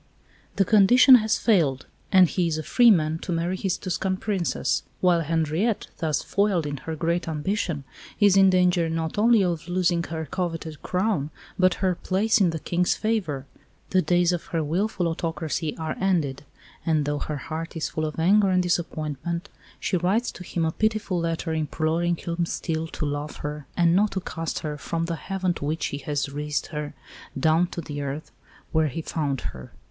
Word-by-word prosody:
The 195 - +3
condition 230 +6 +7
has 220 -1 +1
failed, 160 - +2 0.3
and 185 -2 +7
he 175 +1 0
is 160 -2 -1
a 155 - -3
free 240 - +5
man 160 -5 +3
to 180 - -5
marry 170 +2 0
his 190 -1 -1
Tuscan 185 0 -2
Princess, 190 -4 -1 0.2
while 175 -2 +3
Henriette, 165 +7 0
thus 155 -3 0
foiled 200 -5 +1
in 145 -1 -3
her 160 +4 -5
great 170 +2 -1
ambition, 160 -1 -2 0.4
is 205 -3 +5
in 195 -1 +7
danger 180 -2 +3
not 160 +3 -2
only 225 -1 +5
of 170 -2 -2
losing 175 -1 +1
her 160 -1 -4
coveted 165 -3 -4
crown, 180 -6 0 0.3
but 185 -1 +4
her 185 - +3
place 205 +6 +1
in 185 - +5
the 165 - -2
King's 175 +3 0
favour. 185 -12 -1 0.5
The 185 - +4
days 175 -1 +3
of 175 -2 -3
her 165 -2 -2
wilful 180 +4 0
autocracy 160 -1 -3
are 160 -1 -3
ended; 155 -8 0 0.4
and, 155 -3 +1
though 145 0 -1
her 150 - -3
heart 165 +4 -5
is 160 - -2
full 155 - -2
of 155 - -5
anger 195 +5 +4
and 185 -1 +3
disappointment, 170 +1 -2 0.3
she 185 - 0
writes 195 +8 +1
to 180 - -10
him 170 -2 -2
a 160 - +1
pitiful 215 -2 0
letter 165 0 -2
imploring 160 +2 0
him 170 0 -3
still 160 -1 -2
to 160 - -4
love 145 +1 -3
her 150 -1 -5
and 170 0 +4
not 210 +2 +4
to 190 - -1
cast 165 -3 -4
her 150 -1 -4
"from 165 +3 -2
the 170 0 -2
Heaven 185 +3 -2
to 145 - -6
which 155 +1 -1
he 140 - -3
has 145 -1 -2
raised 145 +1 -3
her, 150 -1 -4 0.4
down 160 +5 +3
to 170 - -6
the 145 -2 -6
earth 140 +2 -5 0.4
where 160 -1 +2
he 155 +4 -4
found 145 -5 -2
her." 65 -1 -8
170 Hz, 185 wpm, -25 LUFS, 155-185 Hz, 0.5 s, condition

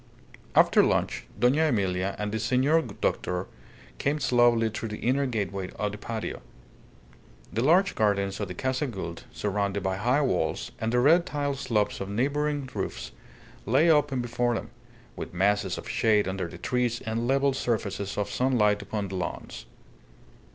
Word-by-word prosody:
After - - +6
lunch, - - 0
Dona 130 +7 +4
Emilia 95 -6 0
and 105 0 -3
the 110 - -2
senor 130 +8 +3
doctor 90 - -2 0.5
came 145 +2 0
slowly 120 -3 +4
through 115 +1 -4
the 105 - -5
inner 135 +3 +1
gateway 100 -5 -3
of 105 -1 -1
the 105 - -8
patio. 110 -1 -5 1.1
The 115 +4 0
large 180 +7 +4
gardens 100 -2 +1
of 105 - -2
the 90 - -7
Casa 130 - -1
Gould, 85 -8 -6
surrounded 100 -1 -2
by 95 0 -1
high 125 +8 +2
walls, 90 - -1
and 110 0 0
the 125 - +3
red 165 +7 +5
tile 145 -1 -1
slopes 110 -6 -1
of 95 - -4
neighbouring 145 +5 0
roofs, - - -4 0.6
lay 145 +9 +5
open 145 -4 +2
before 120 0 0
them, - - -5 0.4
with - - -7
masses 100 0 +1
of - - -8
shade 105 -3 +2
under 95 -1 -2
the 85 - -10
trees 120 -2 0
and 115 +2 -2
level 135 +1 +2
surfaces 100 -6 -2
of 105 - 0
sunlight 110 -5 +2
upon 105 -2 -3
the 95 - -5
lawns. 90 -8 -5
115 Hz, 160 wpm, -27 LUFS, 100-130 Hz, 1.1 s, After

